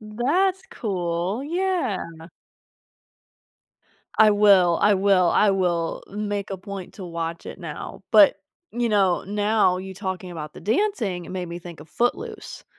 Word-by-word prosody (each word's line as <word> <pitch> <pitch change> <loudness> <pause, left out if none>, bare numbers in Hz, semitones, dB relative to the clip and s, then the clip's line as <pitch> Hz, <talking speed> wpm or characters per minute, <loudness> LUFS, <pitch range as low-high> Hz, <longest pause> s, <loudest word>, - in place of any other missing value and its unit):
That's 295 - 0
cool. 180 +1 -2
Yeah. 345 - -1 2.2
I 220 -1 +7
will 195 -5 +5
I 205 0 +5
will 190 -2 +3
I 210 - +4
will 175 -4 -1
make 205 0 -4
a 195 - -3
point 195 -1 -8
to 195 - -8
watch 165 -1 -5
it - - -8
now, - - -8
but, - - +7 0.4
you 240 0 0
know, 195 -4 +2
now 205 -2 +2
you 190 +1 -7
talking 190 -1 -5
about 155 -3 -7
the - - -10
dancing 220 - -1
made 185 -1 -4
me 170 +1 -6
think 170 -3 -11
of 150 - -13
"Footloose" 425 - -3
200 Hz, 140 wpm, -24 LUFS, 180-220 Hz, 2.2 s, I